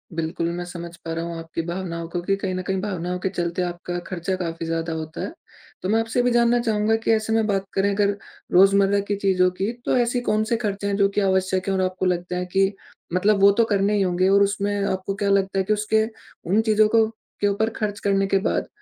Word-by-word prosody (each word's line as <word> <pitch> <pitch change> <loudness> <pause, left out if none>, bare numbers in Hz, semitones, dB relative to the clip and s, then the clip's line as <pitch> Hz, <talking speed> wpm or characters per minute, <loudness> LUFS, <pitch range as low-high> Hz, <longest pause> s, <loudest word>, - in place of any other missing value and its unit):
बिल्कुल। 165 0 -2
मैं 175 - -3
समझ 170 -1 -8
पा 165 - -3
रहा 165 0 -3
हूँ 170 -1 -5
आपकी 165 0 -4
भावनाओं 170 -1 -4
को 175 0 -3
कि 195 +3 +1
कहीं 195 -1 -3
न 185 - -2
कहीं 190 -1 0
भावनाओं 180 -3 -3
के 190 - -1
चलते 175 -1 -2
आपका 175 0 -4
खर्चा 185 +1 -2
काफ़ी 165 -2 -4
ज़्यादा 165 0 -2
होता 160 0 -5
है। - - -4 0.5
तो 185 - -3
मैं 225 +2 +3
आपसे 225 +2 0
भी 245 - +2
जानना 240 0 +3
चाहूँगा 220 -2 +1
कि - - +2
ऐसे 220 0 +1
में 225 -1 +2
बात 195 -2 0
करें 195 +1 +2
अगर 200 0 +1 0.3
रोज़मर्रा 195 +2 +5
की 205 - +1
चीज़ों 190 -2 +2
की 200 +4 0
तो - - +2
ऐसी 245 0 +1
कौन 215 -2 +1
से 230 +1 0
खर्चे 200 -3 -3
हैं 200 - 0
जो 200 -1 +4
की 210 - +2
आवश्यक 190 -1 +1
है 195 - +1
और 190 - +1
आपको 185 0 -1
लगता 180 0 -1
है 180 - -2
कि 195 +1 +3 0.4
मतलब 200 +3 +3
वो 200 0 +8
तो 230 - +6
करने 205 -1 +1
ही 205 - +2
होंगे 185 0 +2
और 200 +1 +5
उसमें 200 0 0 0.2
आपको 190 +1 -3
क्या 200 0 -1
लगता 195 -1 +1
है - - +2
कि 215 - +2
उसके 215 +1 +1 0.5
उन 210 +4 +4
चीज़ों 215 -1 +4
को 225 -1 +6 0.4
के 205 - +3
ऊपर 205 +2 +1
खर्च 210 -1 -2
करने 195 -1 +1
के 195 - +2
बाद - - -1
195 Hz, 240 wpm, -23 LUFS, 180-210 Hz, 0.5 s, वो